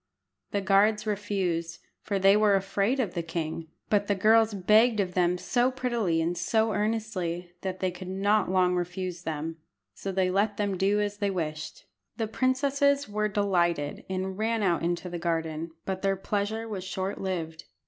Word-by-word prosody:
The 200 - -1
guards 210 +2 +3
refused, 190 -6 -2 0.2
for 200 - -2
they 195 +1 +5
were 210 -1 +4
afraid 200 +6 0
of 215 -9 0
the 170 - -1
king, 165 -1 -4 0.2
but 205 -1 +1
the 205 - +2
girls 220 +3 +4
begged 215 +4 +4
of 185 -2 0
them 180 0 +2
so 240 +7 +1
prettily 235 -10 0
and 170 +2 -1
so 220 +6 +1
earnestly 205 -5 -2
that 185 -1 -4
they 185 -1 +1
could 180 +1 -9
not 200 +3 +1
long 185 -1 +3
refuse 180 0 -3
them, 160 0 -4 0.4
so 195 - -5
they 185 -1 +1
let 205 +2 +1
them 205 -2 0
do 195 +3 +2
as 205 0 -1
they 205 -1 0
wished. 155 -5 -4 0.3
The 225 - 0
princesses 280 +4 +1
were 210 +1 0
delighted, 175 -7 0
and 190 +1 -3
ran 225 0 0
out 175 -3 +2
into 175 +1 -1
the 175 -1 -5
garden, 165 -1 -2 0.2
but 190 -1 -3
their 195 -1 +1
pleasure 210 +3 -2
was 200 -4 -5
short 190 +1 -4
lived. 165 -4 -4
195 Hz, 175 wpm, -28 LUFS, 175-210 Hz, 0.4 s, they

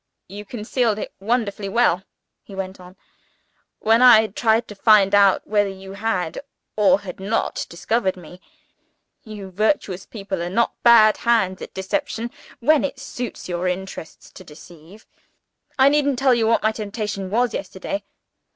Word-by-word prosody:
"You 205 +3 -9
concealed 225 0 -1
it - - -6
wonderfully 210 -2 -2
well," 195 -5 +2 0.4
he 195 - -13
went 190 0 -6
on, 180 0 -14 0.8
"when 225 +2 +3
I 235 -3 +8
tried 220 +2 0
to - - -7
find 205 -1 +4
out 200 -1 +4
whether 205 -1 +1
you 195 0 -10
had, 195 -5 -2 0.4
or 215 +7 +3
had 185 -2 -9
not 205 +4 -2
discovered 190 +2 -1
me. 180 +1 -13 0.8
You 205 -4 -9
virtuous 200 -2 -1
people 195 -4 -5
are 175 - -3
not 230 +5 +1
bad 225 -3 +6
hands 220 -6 +1
at - - -9
deception, 230 +4 -3 0.3
when 305 +4 +3
it 280 -1 -3
suits 245 -3 -7
your 175 0 -2
interests 180 -2 -6
to - - -13
deceive. 170 +6 -15 0.7
I 265 0 +6
needn't 285 -2 +2
tell 260 0 +3
you 230 -2 +1
what 230 - +2
my 220 - +3
temptation 210 -3 -5
was 240 +3 +1
yesterday. 195 +10 -5
210 Hz, 150 wpm, -21 LUFS, 190-235 Hz, 0.8 s, I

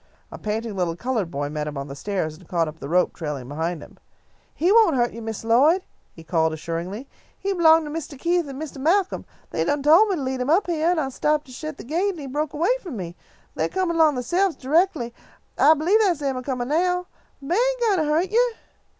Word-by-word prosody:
A - - -8
panting 220 0 -3
little 175 -3 -1
coloured 225 -3 -2
boy 145 -1 -3
met 150 0 -3
him 150 -1 -5
on 140 0 -4
the 140 - -8
stairs 160 -2 -3
and 170 +1 -17
caught 170 -2 0
up 155 +1 -8
the 140 - -7
rope 180 +2 +2
trailing 150 -6 -5
behind 160 +3 -3
him. - - -16 0.5
"He 350 +4 +1
won't 435 -8 +5
hurt 240 -1 +1
you, 230 - -8
Miss 225 -1 -5
Lloyd," 285 +11 +4 0.3
he 165 - -14
called, 160 -1 +1
assuringly. 170 - -5 0.3
"He 395 0 -2
b'long 325 -2 +5
to 300 - -6
Mistah 300 -3 -6
Keith 345 +2 0
an' 270 -1 -7
Mistah 300 -2 -7
Malcolm. 365 +7 +1 0.3
They - - 0
done 290 -1 0
tole 330 +9 +6
me 395 - 0
to 310 - -4
lead 260 -1 -2
him 250 - -2
up 355 +7 +4
heah, 330 -1 0
and 350 -2 +2
I 270 -3 -1
stopped 300 +3 0
to 260 - -14
shet 310 +3 -6
the - - -9
gate 350 +10 0
an' - - -11
he 290 - -7
broke 295 +3 -3
away 345 +11 +2
from 325 - -7
me. 175 -3 -6 0.4
They - - -1
comin' 370 -3 -1
'long 310 -3 +5
theyselves, 345 +9 +1
toreckly, 290 -4 +1 0.5
I 315 - +7
b'lieve 345 +8 +3
that's 370 -8 +2
them 275 -2 -1
a 255 - -3
comin' 255 -1 -3
now. 360 +3 +1 0.3
The 275 - -10
beah 350 - +2
ain't - - +1
gwine 430 -5 +3
to 300 -1 0
hurt 335 +6 +1
you." 480 +1 +3
285 Hz, 240 wpm, -23 LUFS, -, 0.5 s, I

